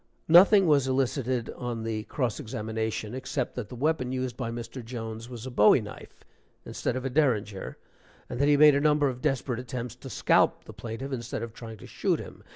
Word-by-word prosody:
(Nothing 190 +4 +7
was 145 -5 +3
elicited 130 -2 0
on 120 -2 -5
the 110 -1 -3
cross 120 -1 -2
examination, 110 0 -4
except 130 0 -3
that 115 -4 -6
the - - -8
weapon 130 -1 0
used 130 -2 -3
by 125 -3 -4
Mr. 115 +2 -6
Jones 115 -1 -6
was 120 -1 -8
a 130 - -6
bowie 105 +1 +6
knife 105 -2 -11 0.4
instead - - -3
of 130 +1 -4
a - - 0
derringer, 110 -9 0 0.5
and 120 - -6
that 140 - +3
he 145 -1 +5
made 150 0 +8
a 140 - +2
number 150 -1 +3
of 125 -1 -6
desperate 130 -2 -1
attempts 125 -1 -5
to 135 - -10
scalp - - +2
the - - -11
plaintiff 120 +4 -6
instead 120 -3 -4
of 115 -1 -7
trying 115 -2 -9
to - - -12
shoot - - -1
him. - - -10
125 Hz, 200 wpm, -27 LUFS, 115-135 Hz, 0.5 s, made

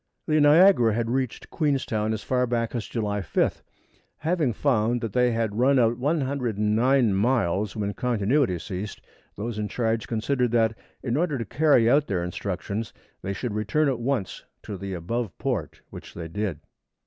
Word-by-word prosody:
The 155 -1 +2
Niagara 145 - +6
had 115 0 -1
reached 130 -2 -3
Queenstown 130 -8 0
as 110 -1 -3
far 125 -1 +1
back 115 -1 -1
as 120 -3 -3
July 105 -3 -2
5th. 90 - 0 0.6
Having 160 -6 0
found 120 -2 +1
that 115 -4 -4
they 125 -1 +3
had 115 -2 -1
run 135 +2 +4
out 120 0 +2
109 125 -4 +1
miles 105 -2 +1
when 100 -2 -2
"continuity" 120 -2 +1
ceased, 95 +5 -6 0.4
those 110 +1 -4
in 105 - -1
charge 115 +1 -1
considered 125 +2 0
that, 115 -1 +3 0.3
in 125 0 -1
order 155 -3 0
to 115 - -3
carry 145 -2 +3
out 145 +4 +4
their 90 -3 -1
instructions, 100 +4 -4 0.3
they 100 - -3
should 115 +2 -4
return 110 +9 +1
at 130 -3 -1
once 120 -5 -2 0.2
to 105 - -6
the 95 0 -5
above 95 +3 -3
port, - - -3
which - - -11
they 85 -1 -6
did. 90 -2 -3
115 Hz, 165 wpm, -25 LUFS, 105-130 Hz, 0.6 s, Niagara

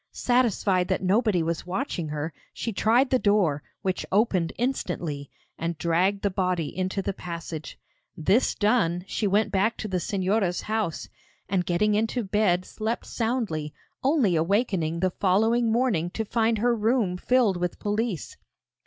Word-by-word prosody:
Satisfied 215 -7 +2
that - - -1
nobody 200 -2 +2
was 165 +1 -3
watching 185 - -2
her, 150 +1 -4 0.2
she 230 - -3
tried 240 +7 +3
the 255 - +4
door, 195 -10 +2 0.2
which 185 -1 -1
opened 190 -5 +2
instantly, 175 - -2 0.3
and 170 0 -2
dragged 180 +5 +1
the 200 - +1
body 180 -4 -1
into 185 +2 -2
the 195 - -2
passage. 165 -3 -7 0.4
This 195 +10 +2
done 205 -6 +2
she 210 - -1
went 205 +3 +2
back 205 +4 +1
to 215 - -4
the 190 -2 -1
Señora's 190 -1 0
house, 215 -6 -2 0.4
and 185 -2 0
getting 210 +5 +2
into 225 +3 0
bed 190 -3 +1
slept 220 +2 -3
soundly, 220 - -2 0.3
only 260 - +3
awakening 170 -2 0
the 185 -1 +2
following 225 +6 +2
morning 225 -8 +1
to 220 +5 -3
find 225 +1 +1
her 240 +2 +2
room 220 -4 +1
filled 225 -1 +2
with 180 0 -2
police. 210 -4 -2
195 Hz, 150 wpm, -26 LUFS, 175-225 Hz, 0.4 s, the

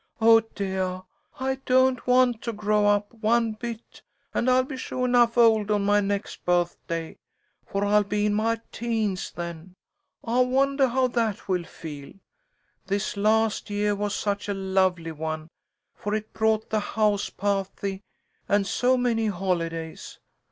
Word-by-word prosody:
"Oh, 225 0 +7
deah! 190 -4 -3 0.4
I 265 0 -1
don't 260 -1 +3
want 250 -2 +4
to 235 - -3
grow 210 0 +1
up, 205 +1 +1
one 230 0 +1
bit, 230 +1 -8 0.3
and 255 - +1
I'll 255 0 +4
be 265 +1 -7
suah 255 -1 -3
'nuff 240 -1 +3
old 220 -3 +5
on 205 -1 +1
my 205 +1 +4
next 200 0 -3
birthday, 170 -2 -1 0.5
for 200 0 -1
I'll 210 +1 +4
be 205 +1 -1
in 210 - +1
my 225 +2 +1
teens 220 -5 -2
then. 170 +1 -7 0.5
I 235 +2 0
wondah 270 +1 +2
how 260 +2 +2
that 225 -4 -1
will 180 -3 0
feel. 145 -5 -9 0.7
This 200 +2 -1
last 215 +2 +1
yeah 205 0 0
was 205 0 -2
such 205 0 -2
a 200 - -1
lovely 190 -3 0
one, 155 0 -5 0.4
for 210 +1 -3
it 215 0 -5
brought 220 0 +1
the 215 - +2
house 210 -1 0
pahty 195 0 -2 0.5
and 200 0 +3
so 250 +5 +2
many 230 -3 +1
holidays. 170 -4 -3
210 Hz, 150 wpm, -25 LUFS, 195-230 Hz, 0.7 s, Oh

